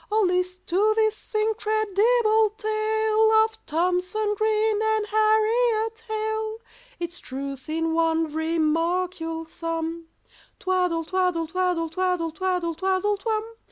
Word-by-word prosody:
Oh, 435 +1 +3
list 365 -1 0
to 410 +5 +2
this 435 0 -1
incredible 435 +1 +2
tale 435 0 +1
Of 445 0 -9
THOMSON 365 +6 0
GREEN 435 0 +1
and 440 -1 +1
HARRIET 440 +1 +2
HALE, 435 0 -2 0.4
Its 345 0 -5
truth 270 +1 -7
in 325 +1 -1
one 325 -1 +1
remark 330 +3 0
you'll 325 0 -4
sum— 330 0 -4 0.5
"Twaddle 360 -3 0
twaddle 360 -2 0
twaddle 355 0 0
twaddle 355 0 -1
twaddle 360 0 -1
twaddle 380 +4 0
twum!" 430 +1 -1
375 Hz, 115 wpm, -25 LUFS, 330-435 Hz, 0.5 s, Oh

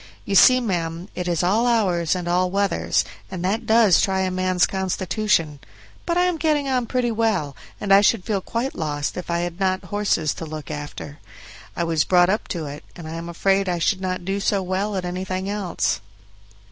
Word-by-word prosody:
You - - -3
see, 255 +6 +7
ma'am, 175 -5 -3
it 180 -1 -4
is 175 -1 0
all 215 +7 +2
hours 185 -8 +2
and 180 -1 -4
all 180 +1 +2
weathers, 180 - +1 0.2
and 180 +5 -4
that 210 +5 -1
does 220 -5 +5
try 190 -1 +1
a 185 -1 0
man's 185 -1 +2
constitution; 190 -4 -1 0.5
but 340 - +1
I 355 - +4
am 360 -2 +1
getting 300 -3 +1
on 250 -3 0
pretty 250 -1 0
well, 215 -11 0 0.2
and 200 -1 +2
I 200 - +8
should 205 -1 +3
feel 205 -4 -1
quite 235 +7 -3
lost 145 -2 -3
if 180 - -6
I 170 0 0
had 175 +1 -4
not 185 -1 0
horses 200 -7 0
to 165 - -7
look 155 0 -7
after. 145 0 -7 0.6
I 170 - -1
was 165 -2 +1
brought 180 -1 +4
up 210 +3 0
to 165 -3 -4
it, 145 +1 -8
and 170 -3 -9
I 160 - -6
am 165 +1 -6
afraid 195 +3 +1
I 175 - 0
should 185 +3 0
not 185 -1 -3
do 195 +1 -1
so 195 0 0
well 190 +3 -2
at 185 -1 -2
anything 185 +1 -3
else." 200 - -1
185 Hz, 205 wpm, -22 LUFS, 170-205 Hz, 0.6 s, I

